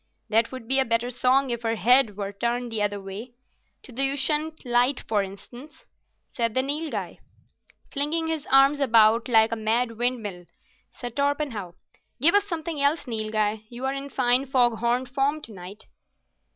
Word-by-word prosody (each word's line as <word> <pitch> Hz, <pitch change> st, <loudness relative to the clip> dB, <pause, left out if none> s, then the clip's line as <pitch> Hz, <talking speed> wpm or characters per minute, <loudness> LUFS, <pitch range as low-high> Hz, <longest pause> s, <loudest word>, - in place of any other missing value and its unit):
"That 225 Hz, +1 st, +2 dB
would 255 Hz, -3 st, -9 dB
be 270 Hz, +2 st, +6 dB
a -, -, +5 dB
better 230 Hz, +1 st, 0 dB
song 255 Hz, +2 st, +2 dB
if 235 Hz, -1 st, -3 dB
her 225 Hz, -1 st, -1 dB
head 235 Hz, -2 st, +3 dB
were 200 Hz, -1 st, -4 dB
turned 240 Hz, +3 st, -2 dB
the 220 Hz, -2 st, -1 dB
other 205 Hz, -1 st, -1 dB
way—to 235 Hz, +7 st, -12 dB
the 270 Hz, +3 st, +3 dB
Ushant 300 Hz, +3 st, -1 dB
light, 245 Hz, +2 st, +1 dB
for 210 Hz, -2 st, +1 dB
instance," 240 Hz, -, -9 dB, 0.5 s
said 230 Hz, -2 st, -2 dB
the 260 Hz, -, +2 dB
Nilghai. 300 Hz, +3 st, -4 dB, 0.7 s
"Flinging 305 Hz, +3 st, -1 dB
his 320 Hz, -2 st, -3 dB
arms 275 Hz, +2 st, +4 dB
about 230 Hz, -3 st, +4 dB
like 225 Hz, -1 st, +4 dB
a -, -, 0 dB
mad 230 Hz, +1 st, -1 dB
windmill," 215 Hz, -8 st, -2 dB, 0.4 s
said 245 Hz, -2 st, -8 dB
Torpenhow. 280 Hz, -, -2 dB, 0.5 s
"Give 315 Hz, +7 st, +5 dB
us 405 Hz, 0 st, +3 dB
something 330 Hz, -5 st, -4 dB
else, 285 Hz, +3 st, +1 dB
Nilghai. 215 Hz, -2 st, -1 dB
You're 260 Hz, +3 st, -4 dB
in 275 Hz, +1 st, -6 dB
fine 255 Hz, 0 st, +2 dB
fog 245 Hz, -3 st, +2 dB
horn 240 Hz, +2 st, 0 dB
form 275 Hz, +4 st, -1 dB
tonight." 200 Hz, -4 st, -10 dB
245 Hz, 160 wpm, -25 LUFS, 225-275 Hz, 0.7 s, be